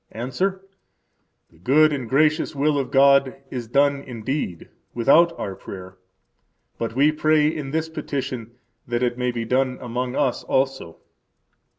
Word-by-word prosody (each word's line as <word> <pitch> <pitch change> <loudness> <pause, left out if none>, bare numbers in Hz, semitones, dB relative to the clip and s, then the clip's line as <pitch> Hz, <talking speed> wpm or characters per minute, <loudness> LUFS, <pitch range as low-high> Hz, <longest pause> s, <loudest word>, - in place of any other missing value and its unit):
–Answer: 185 - -3 0.9
The 80 - -23
good 150 - +4
and 130 -5 -4
gracious 155 +3 +2
will 145 +1 +1
of 135 - -3
God 140 -1 +4 0.2
is 120 -3 -5
done 140 +3 +2
indeed 125 - -4 0.3
without 165 +8 +4
our 95 - -4
prayer; 95 -1 -10 0.8
but 115 0 -3
we 145 +3 +4
pray 155 0 +2
in 155 -3 -3
this 160 +2 -1
petition 130 -7 -5 0.3
that 120 +1 -1
it 120 0 -1
may 125 0 0
be 120 -1 -3
done 130 +2 0
among 125 +1 -4
us 135 -4 0
also. 135 -11 -1
135 Hz, 145 wpm, -23 LUFS, 120-150 Hz, 0.9 s, good